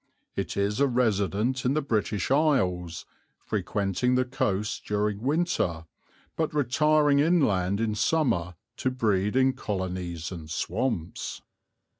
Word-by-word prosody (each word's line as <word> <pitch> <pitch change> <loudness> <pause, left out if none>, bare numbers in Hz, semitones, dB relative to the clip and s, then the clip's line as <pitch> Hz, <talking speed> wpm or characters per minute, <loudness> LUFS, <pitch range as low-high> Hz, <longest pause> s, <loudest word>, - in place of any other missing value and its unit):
It - - -3
is 100 +3 0
a 140 - +4
resident 120 0 +1
in 130 +3 +1
the 155 - +2
British 110 -5 -1
Isles, 95 - +1 0.3
frequenting 105 +5 -1
the 130 0 +2
coasts 125 -6 -1
during 105 0 -1
winter, 130 - 0 0.5
but 160 -2 -1
retiring 150 +1 +3
inland 105 - +2
in 110 -1 0
summer 105 - +1 0.2
to 130 - 0
breed 105 -4 0
in 130 0 +4
colonies 90 -7 -4
in 80 -4 -7
swamps." 90 +2 -3
110 Hz, 120 wpm, -27 LUFS, 95-135 Hz, 0.5 s, a